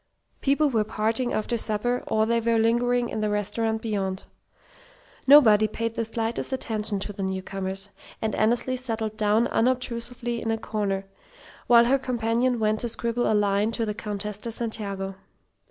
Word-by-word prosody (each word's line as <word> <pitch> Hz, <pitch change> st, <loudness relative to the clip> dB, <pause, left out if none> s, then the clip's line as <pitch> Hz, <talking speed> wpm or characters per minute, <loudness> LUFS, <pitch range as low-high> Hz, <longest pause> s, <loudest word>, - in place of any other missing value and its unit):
People 280 Hz, +1 st, +2 dB
were 220 Hz, -3 st, +2 dB
parting 225 Hz, +3 st, -1 dB
after 225 Hz, +2 st, -1 dB
supper; 230 Hz, +3 st, -1 dB
or 220 Hz, 0 st, +2 dB
they 235 Hz, +1 st, +2 dB
were 230 Hz, 0 st, +1 dB
lingering 240 Hz, +2 st, +2 dB
in 220 Hz, -, -4 dB
the 215 Hz, -, 0 dB
restaurant 220 Hz, +2 st, -1 dB
beyond. 195 Hz, -4 st, -2 dB, 1.0 s
Nobody 220 Hz, -7 st, +7 dB
paid 230 Hz, +1 st, -3 dB
the 230 Hz, -, -1 dB
slightest 225 Hz, +2 st, -2 dB
attention 215 Hz, -5 st, -2 dB
to 205 Hz, -, -5 dB
the 195 Hz, -, -7 dB
newcomers, 190 Hz, +1 st, -3 dB, 0.3 s
and 220 Hz, -2 st, -2 dB
Annesley 240 Hz, +3 st, +1 dB
settled 225 Hz, -4 st, -3 dB
down 215 Hz, +2 st, +2 dB
unobtrusively 240 Hz, -1 st, -1 dB
in 225 Hz, -, -3 dB
a 225 Hz, -, +1 dB
corner, 205 Hz, -3 st, -2 dB, 0.6 s
while 235 Hz, -1 st, +7 dB
her 270 Hz, +3 st, +3 dB
companion 245 Hz, -1 st, 0 dB
went 215 Hz, -1 st, +1 dB
to 240 Hz, -, -2 dB
scribble 235 Hz, +1 st, -1 dB
a -, -, +3 dB
line 205 Hz, +1 st, +2 dB
to 225 Hz, 0 st, 0 dB
the 210 Hz, -, -2 dB
Countess 210 Hz, -1 st, -4 dB
de 230 Hz, -, -5 dB
Santiago. 200 Hz, -4 st, -4 dB
225 Hz, 160 wpm, -25 LUFS, 210-235 Hz, 1.0 s, Nobody